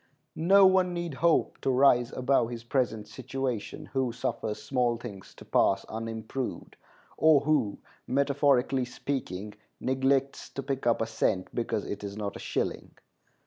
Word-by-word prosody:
No 195 Hz, +4 st, +6 dB
one 185 Hz, -1 st, +4 dB
need 170 Hz, -3 st, -3 dB
hope 165 Hz, +4 st, +1 dB
to -, -, 0 dB
rise 125 Hz, -2 st, +4 dB
above 130 Hz, -2 st, +1 dB
his 120 Hz, -1 st, -6 dB
present 120 Hz, -4 st, -1 dB
situation 130 Hz, +3 st, -4 dB
who 130 Hz, -2 st, +1 dB
suffers 115 Hz, -2 st, -3 dB
small 125 Hz, -3 st, 0 dB
things 105 Hz, -5 st, -10 dB
to -, -, -13 dB
pass 95 Hz, 0 st, +2 dB
unimproved, 115 Hz, +3 st, -5 dB, 0.4 s
or 155 Hz, -3 st, +5 dB
who, 145 Hz, -9 st, +1 dB, 0.3 s
metaphorically 140 Hz, -2 st, +2 dB
speaking, 105 Hz, -6 st, -4 dB, 0.3 s
neglects 135 Hz, +1 st, 0 dB
to 135 Hz, -, -4 dB
pick 135 Hz, -2 st, -2 dB
up 115 Hz, -1 st, +3 dB
a -, -, -1 dB
cent 110 Hz, -4 st, -1 dB
because 115 Hz, -3 st, -2 dB
it 100 Hz, 0 st, -5 dB
is 100 Hz, 0 st, -6 dB
not 100 Hz, -2 st, -4 dB
a -, -, -7 dB
shilling. -, -, -3 dB
125 Hz, 145 wpm, -28 LUFS, 115-140 Hz, 0.4 s, No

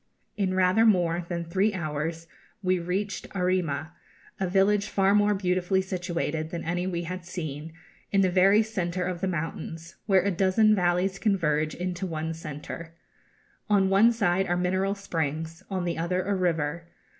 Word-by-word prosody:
In 190 Hz, -3 st, 0 dB
rather 185 Hz, +4 st, +4 dB
more 175 Hz, -5 st, +2 dB
than 170 Hz, -1 st, -3 dB
three 195 Hz, +5 st, +1 dB
hours 160 Hz, 0 st, -3 dB, 0.4 s
we 185 Hz, 0 st, +2 dB
reached 185 Hz, +4 st, -3 dB
Arrima, 180 Hz, -4 st, 0 dB, 0.5 s
a 190 Hz, -, 0 dB
village 200 Hz, +2 st, +3 dB
far 195 Hz, 0 st, +2 dB
more 205 Hz, 0 st, +4 dB
beautifully 185 Hz, 0 st, +1 dB
situated 175 Hz, -4 st, -3 dB
than 170 Hz, 0 st, -5 dB
any 175 Hz, +2 st, -1 dB
we 175 Hz, -2 st, -2 dB
had 180 Hz, +1 st, -5 dB
seen, 160 Hz, -3 st, -6 dB, 0.4 s
in 195 Hz, -, +4 dB
the 185 Hz, -2 st, +2 dB
very 195 Hz, +4 st, +5 dB
centre 180 Hz, -4 st, -2 dB
of 180 Hz, -1 st, -3 dB
the 190 Hz, -, 0 dB
mountains, 165 Hz, 0 st, -5 dB
where 190 Hz, -3 st, +4 dB
a 200 Hz, -, +1 dB
dozen 195 Hz, +4 st, +3 dB
valleys 185 Hz, 0 st, +1 dB
converge 155 Hz, -7 st, +1 dB
into 180 Hz, +1 st, -3 dB
one 160 Hz, -1 st, -3 dB
centre. 160 Hz, +1 st, -8 dB, 0.7 s
On 195 Hz, -2 st, +4 dB
one 210 Hz, +5 st, +6 dB
side 195 Hz, -5 st, +1 dB
are 175 Hz, -, +1 dB
mineral 190 Hz, +2 st, 0 dB
springs, 165 Hz, -3 st, -3 dB
on 185 Hz, -3 st, -2 dB
the 170 Hz, -1 st, -2 dB
other 180 Hz, +2 st, 0 dB
a 200 Hz, -, -1 dB
river. 170 Hz, -3 st, -1 dB
180 Hz, 160 wpm, -27 LUFS, 165-195 Hz, 0.7 s, one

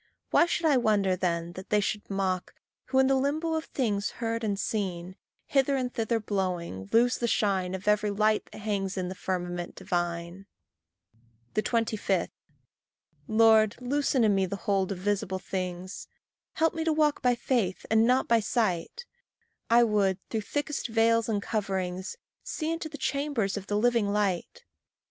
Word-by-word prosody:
Why 340 Hz, -, +5 dB
should 340 Hz, 0 st, -1 dB
I 295 Hz, -4 st, +5 dB
wonder 205 Hz, -5 st, +2 dB
then 170 Hz, -2 st, -1 dB
that 185 Hz, +1 st, -9 dB
they 210 Hz, -, +3 dB
should 205 Hz, +1 st, -2 dB
mock, 190 Hz, -2 st, -2 dB, 0.3 s
Who, 260 Hz, 0 st, -1 dB
in 265 Hz, -, +6 dB
the 270 Hz, -, +3 dB
limbo 295 Hz, +5 st, 0 dB
of 320 Hz, 0 st, -1 dB
things 210 Hz, -6 st, -1 dB
heard 230 Hz, 0 st, -2 dB
and 200 Hz, -2 st, -1 dB
seen, 185 Hz, -4 st, -3 dB, 0.3 s
Hither 275 Hz, 0 st, +2 dB
and 255 Hz, -2 st, -2 dB
thither 230 Hz, -1 st, 0 dB
blowing, 180 Hz, -, -3 dB
lose 240 Hz, +2 st, +3 dB
the 235 Hz, -, 0 dB
shine 190 Hz, -4 st, +1 dB
Of 190 Hz, +2 st, -8 dB
every 210 Hz, 0 st, +3 dB
light 215 Hz, +1 st, +2 dB
that -, -, -13 dB
hangs 200 Hz, -2 st, -2 dB
in 180 Hz, -1 st, -2 dB
the -, -, -4 dB
firmament 175 Hz, -2 st, -4 dB
divine. 175 Hz, +2 st, -3 dB, 1.1 s
25. 220 Hz, 0 st, 0 dB, 1.0 s
Lord, 220 Hz, -1 st, +5 dB
loosen 265 Hz, 0 st, +1 dB
in 215 Hz, -2 st, +4 dB
me 190 Hz, -1 st, +2 dB
the 200 Hz, -, -3 dB
hold 195 Hz, -2 st, +1 dB
of 195 Hz, -, -3 dB
visible 190 Hz, 0 st, -1 dB
things; 185 Hz, -1 st, -5 dB, 0.5 s
Help 325 Hz, -2 st, +2 dB
me 325 Hz, -, -2 dB
to 325 Hz, -, +1 dB
walk 300 Hz, -1 st, +2 dB
by 250 Hz, -1 st, +3 dB
faith 235 Hz, -7 st, -1 dB
and 220 Hz, +1 st, +5 dB
not 255 Hz, +1 st, +3 dB
by 230 Hz, -1 st, +4 dB
sight; 220 Hz, -, -1 dB, 0.6 s
I 235 Hz, +1 st, +6 dB
would, 205 Hz, -4 st, +2 dB
through 220 Hz, -, -1 dB
thickest 290 Hz, +7 st, -3 dB
veils 230 Hz, 0 st, +2 dB
and 205 Hz, -2 st, 0 dB
coverings, 190 Hz, -, -3 dB, 0.3 s
See 315 Hz, 0 st, -3 dB
into 330 Hz, -1 st, -3 dB
the 295 Hz, -, -8 dB
chambers 265 Hz, -6 st, -1 dB
of 200 Hz, -1 st, -6 dB
the 205 Hz, -, 0 dB
living 235 Hz, -1 st, +2 dB
light. 200 Hz, -4 st, -1 dB
210 Hz, 165 wpm, -28 LUFS, 190-245 Hz, 1.1 s, in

